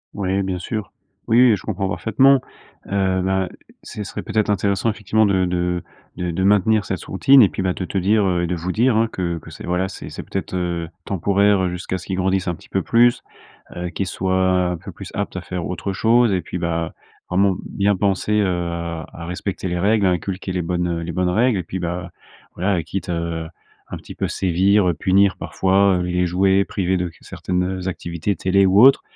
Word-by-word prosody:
Oui, 95 -1 0
bien 95 -1 -2
sûr! 105 +4 -5 0.4
Oui 115 +2 +4
et - - +4
je 95 - -9
comprends 100 -2 -2
parfaitement, 130 +7 +3 0.5
heu, 95 -2 +1
bah, 95 0 0 0.4
ce 105 - -6
serait 100 - -6
peut-être 110 -1 0
intéressant, 100 +1 +1
effectivement, 110 0 +1
de 95 -2 +2
de 90 -1 -1 0.3
de 90 -1 -2
de 90 +3 -1
maintenir 105 +2 +3
cette 95 - -4
routine 130 +8 +6
et 100 - +4
puis, - - -4
bah, 95 -1 0
de 95 - -4
te 95 - -4
dire, 100 +3 +2
heu 90 -2 +1
et - - 0
de 90 - -1
vous 85 +2 -3
dire, 115 +3 +2
hein, 115 +1 +3
que 85 -2 -2
que - - -11
c'est, - - -9
voilà, 90 +2 0
c'est - - -9
c'est - - -7
peut-être, 95 -1 -4
heu, 85 -2 -2 0.2
temporaire, 100 +1 +2
heu, - - 0
jusqu'à 90 +1 -4
ce - - -12
qu'ils 95 - -2
grandissent 95 0 0
un 85 - -1
petit - - -18
peu 95 - 0
plus, 120 +4 +3 0.5
heu, 90 0 -4
qu'ils 95 +3 -3
soient 95 -1 +1
un - - -5
peu - - -10
plus - - -10
aptes 100 -1 -3
à - - -4
faire 90 -1 -5
autre 90 +2 -3
chose 115 +3 +3
et 95 -2 +1
puis, 90 - -5
bah, 85 -1 -2 0.3
vraiment 95 +1 +2
bien 100 0 +1
penser, 100 +2 0
heu, - - +2
à 85 -2 -4
respecter 90 +2 -4
les 90 0 -2
règles, 105 +2 +2
à 95 - +4
inculquer 95 +2 -3
les 90 -1 -1
bonnes 85 0 -1
les 85 +1 -4
bonnes 90 +1 0
règles 115 +4 +2
et 90 - -2
puis 95 +3 -5
,bah, 90 +1 -4 0.4
voilà, 90 -1 0
quitte, 95 +4 -5
heu, 85 -1 -3 0.4
un - - -6
petit - - -11
peu - - -2
sévir, 95 +2 +2
heu, 90 - +2
punir 95 +3 +3
parfois, 95 -1 +2
les 90 0 0
jouets, 95 +2 +3
privés 95 -1 -1
de 90 -1 -2
certaines, 90 0 -2
heu, 95 0 -3
activités, 85 +2 -3
télé 95 +3 +2
ou 95 +2 +4
autres, 135 +2 +7
95 Hz, 215 wpm, -21 LUFS, 90-100 Hz, 0.5 s, autres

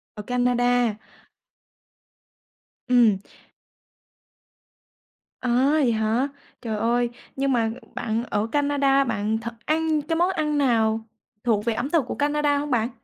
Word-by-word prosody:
Ở 210 - -6
Canada. 245 -1 +1 1.9
Ừm. 235 -6 +4 2.2
À, 250 - -2 0.2
vậy 280 -6 +3
hả? 220 +4 +1 0.3
Trời 220 -3 -3
ơi, 235 +2 +1 0.3
nhưng 275 0 0
mà 230 -3 +1 0.2
bạn 225 0 -2
ở 215 -2 -1
Canada 285 -1 +2
bạn 220 -2 -1
thật 235 +1 -6
ăn 315 0 +1
cái 325 +3 -2
món 350 +3 +2
ăn 300 -4 -1
nào 225 -5 +2 0.4
thuộc 220 -3 +1
về 235 - +1
ẩm 245 +5 -3
thực 305 -5 +2
của - - -4
Canada 290 0 +1
hông 290 +1 -3
bạn? 230 -1 +1
245 Hz, 130 wpm, -24 LUFS, 225-285 Hz, 2.2 s, Ừm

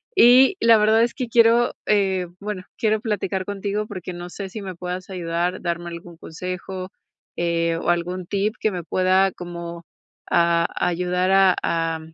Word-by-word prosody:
y, 255 +8 +7
la 230 -1 +6
verdad, 220 +2 +4
es 240 - 0
que 255 - -4
quiero, 235 +1 +4
eh, 190 -3 +1
bueno, 200 -2 -5
quiero 215 -1 +1
platicar 200 -4 -2
contigo, 205 +1 -3
porque 185 -2 -7
no 175 0 -7
sé, 195 +2 -7
si 215 +3 -7
me 185 -2 -6
puedas 180 +2 -6
ayudar, 175 0 -2
darme 170 0 -3
algún 170 0 -10
consejo, 185 +2 -6 0.5
eh, 170 -1 0
o 165 - -3
algún 175 +1 -1
tip, 205 +3 -1
que 215 - +1
me 180 -2 -5
pueda 185 +2 +2
como, 170 -1 -8 0.4
a 170 0 +3 0.2
ayudar 180 +1 0
a 195 -1 +5
a 165 -1 -1
185 Hz, 165 wpm, -22 LUFS, 175-205 Hz, 0.5 s, y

